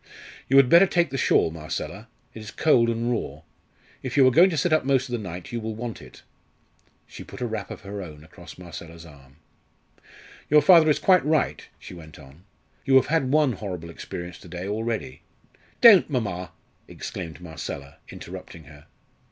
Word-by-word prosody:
"You 135 - +4
had 135 -2 +7
better 170 +8 +6
take 175 -6 0
the 135 - -3
shawl, 80 - +2
Marcella: 80 -1 -6 0.3
it - - -10
is 110 -1 -9
cold 120 -6 +2
and 115 +1 -1
raw. 120 - -4 0.6
If 130 +1 -5
you 135 - +6
are - - +4
going 175 +9 +6
to 165 - -3
sit 155 +3 +1
up 155 - +3
most 135 0 +1
of - - -6
the 120 - -1
night 90 -3 -8
you 120 -1 -4
will 110 0 -5
want 115 0 -6
it." - - -15 0.8
She - - -11
put - - -12
a 125 - -2
wrap 110 -3 -5
of - - -9
her 100 0 -7
own 75 -4 -11
across 85 +2 -14
Marcella's 85 -1 -11
arm. 70 -4 -17 1.1
"Your 150 -1 +5
father 165 -1 +6
is 150 - +3
quite 185 -2 +3
right," 155 +1 -1
she - - -12
went 80 -3 -13
on. 70 +5 -17 0.4
"You 135 - +2
have 130 - +6
had 135 -6 +1
one 150 -2 +3
horrible 90 -5 -7
experience 85 +1 -8
to - - -14
day 90 +2 -7
already 110 - -4 0.3
" - - -34
"Don't, 215 -9 +8
mamma!" 100 -9 -3 0.4
exclaimed 85 -3 -8
Marcella, 80 -5 -8
interrupting 90 -2 -10
her. 75 -1 -17
110 Hz, 190 wpm, -24 LUFS, 85-135 Hz, 1.1 s, Don't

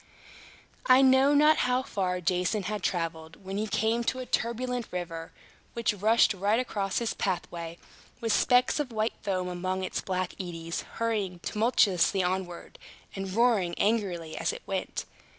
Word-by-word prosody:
I 255 +1 +7
know 265 +2 +5
not 300 +2 +6
how 250 +1 +1
far 185 -7 -2
Jason 180 +4 0
had 210 +1 -3
traveled, 165 -1 -3
when 195 +1 -4
he 215 +1 -1
came 225 +3 +1
to 255 - 0
a 255 - -5
turbulent 245 0 -2
river, 165 -2 -5 0.4
which 235 -2 0
rushed 220 +2 +4
right 200 +4 +1
across 200 -6 -2
his 235 -2 0
pathway, 170 -3 -3 0.4
with 225 -3 0
specks 250 +4 +3
of 280 -4 -2
white 220 0 0
foam 185 -3 -1
among 185 +1 -2
its 185 - -2
black 185 -1 -2
eddies, 170 -2 -4
hurrying 210 -6 -1
tumultuously 200 -4 +2
onward, 180 -1 -4 0.4
and 195 -1 -4
roaring 220 -6 +2
angrily 190 -7 0
as - - -1
it 485 +2 -9
went. - - -3
200 Hz, 150 wpm, -28 LUFS, 180-235 Hz, 0.4 s, I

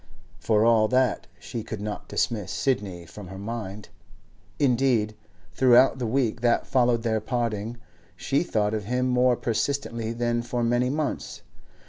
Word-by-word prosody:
For 110 +4 +2
all 115 -2 +5
that, 130 +2 +1
she 120 -3 -6
could 110 -1 -6
not 105 0 -5
dismiss 105 -7 -1
Sidney 100 -10 -1
from 95 +4 -10
her 95 +1 -9
mind; 105 -1 -6 0.7
indeed, 125 -5 +2 0.4
throughout 130 +2 +5
the 120 - -1
week 120 -1 0
that 120 -1 +2
followed 120 -3 +2
their 110 -2 +1
parting, 115 -1 -2 0.4
she 140 - 0
thought 110 -10 0
of 105 -2 -3
him 125 +3 0
more 125 0 +3
persistently 115 -1 -2
than 120 0 0
for 120 0 -2
many 120 +2 +2
months. 150 +2 -3
120 Hz, 145 wpm, -26 LUFS, 110-125 Hz, 0.7 s, all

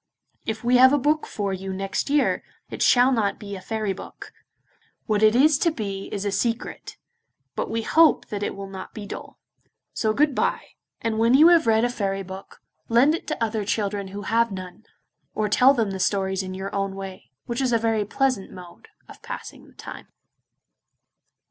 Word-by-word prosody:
If 220 +1 -3
we 245 +1 +4
have 260 +1 +7
a - - +4
book 300 +3 +1
for 200 -2 -3
you 190 +1 -5
next 195 +7 -3
year, 290 0 +2 0.3
it - - -6
shall 250 +1 +5
not 220 -5 0
be 200 -1 -7
a 190 - -8
fairy 215 -1 -2
book. - - -11 0.7
What 215 -1 0
it 215 +1 +5
is 285 +2 +5
to 340 - +3
be 200 -9 -5
is 200 0 -3
a 200 - 0
secret, 230 +4 -3 0.6
but - - -3
we 225 0 -2
hope 320 +4 +4
that 205 -1 -4
it 205 - -3
will 200 0 -7
not 190 -1 -9
be 210 - -6
dull. - - -9 0.6
So 220 - 0
good 290 +5 +2
bye, - - -1 0.3
and 225 -1 -1
when 230 +3 +4
you 310 +5 +8
have 335 -5 +4
read 220 0 +4
a - - 0
fairy 195 -4 -2
book, 190 +1 -11 0.3
lend 245 +6 +5
it 335 - -5
to 305 -6 -2
other 220 -1 -1
children 205 -1 -2
who 200 +2 -7
have 230 +2 +1
none, 185 +3 -9 0.5
or 215 - 0
tell 250 +6 +5
them 225 -5 0
the 190 - -5
stories 190 0 0
in 185 0 -6
your 190 +1 -6
own 195 -1 -2
way, 195 -1 -8 0.2
which 235 +2 -3
is 260 -2 +1
a 230 - +4
very 225 -1 0
pleasant 255 -1 -1
mode 180 - -13 0.2
of - - -14
passing - - -8
the - - -21
time. - - -10
215 Hz, 200 wpm, -24 LUFS, 195-245 Hz, 0.7 s, you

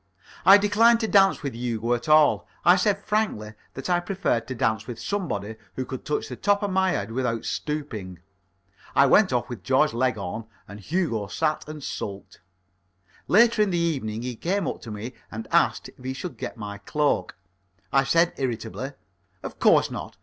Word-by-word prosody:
I 195 +1 +11
declined 220 +3 +4
to 220 - 0
dance 195 -4 +4
with 140 - -3
Hugo 115 0 -2
at 120 +5 -3
all. 155 -1 +5 0.2
I 175 - +8
said 200 +1 +2
frankly 205 - -1 0.2
that 135 - -5
I 175 -1 +2
preferred 175 - -1
to 130 - -5
dance 110 -2 0
with 120 -2 -6
somebody 110 - -3 0.2
who 130 - -3
could 130 0 -7
touch 150 - -2
the - - -6
top 205 0 +1
of 200 - -1
my 190 0 +2
head 105 - -2
without 115 -2 -2
stooping. 115 - -4 0.8
I - - +6
went - - +5
off - - 0
with - - -7
Georgie - - +2
Leghorn, 110 -4 -1 0.2
and 100 +1 -10
Hugo 115 - -1
sat 155 +6 -1
and 155 -2 -8
sulked. 100 -8 -6 0.9
Later 230 +2 +5
in 210 - +3
the 175 - 0
evening 130 -10 -1
he 125 -1 -4
came 185 - -1
up - - -4
to 115 - -9
me 110 +4 -6 0.2
and 110 0 -7
asked - - +2
if - - -17
he 130 +1 -3
should 180 +5 -6
get - - -6
my 100 -2 -7
cloak. 140 -3 0 0.6
I 135 - +5
said 165 +5 +3
irritably: 130 +1 -4 0.5
"Of - - -7
course - - +4
not. - - -7
135 Hz, 185 wpm, -25 LUFS, 110-180 Hz, 0.9 s, I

